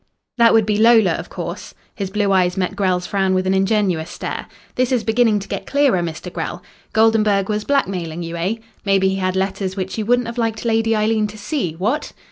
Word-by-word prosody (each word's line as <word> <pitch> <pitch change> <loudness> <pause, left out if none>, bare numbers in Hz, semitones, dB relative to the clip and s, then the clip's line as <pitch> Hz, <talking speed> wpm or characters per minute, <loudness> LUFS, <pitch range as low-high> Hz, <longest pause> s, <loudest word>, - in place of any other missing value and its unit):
"That 230 -1 +6
would 220 -2 +4
be 210 -1 0
Lola, 220 -4 +5
of - - -4
course." - - -7 0.2
His 195 -2 -4
blue 205 0 0
eyes 185 -1 +2
met 185 -1 -1
Grell's 185 -2 0
frown 190 -2 0
with 185 0 0
an 190 - +2
ingenuous 190 -4 +1
stare. - - -5 0.3
"This 255 0 0
is 250 -3 +1
beginning 225 -1 +3
to 195 - -9
get - - -5
clearer, 280 -9 +3
Mr. 170 +1 -5
Grell. 175 +1 -5 0.3
Goldenburg 215 -3 +3
was 210 0 -1
blackmailing 180 - -1
you, 165 0 -5
eh? 180 +6 -1 0.3
Maybe 195 -1 +3
he 190 - -1
had 185 -1 -1
letters 190 0 -2
which 190 -1 -4
you 215 - -3
wouldn't 245 0 +2
have 235 +1 -5
liked 225 0 -2
Lady 225 0 +2
Eileen 215 0 +1
to 210 +1 -11
see 210 - -2
what?" 215 - -2
200 Hz, 210 wpm, -20 LUFS, 185-225 Hz, 0.3 s, That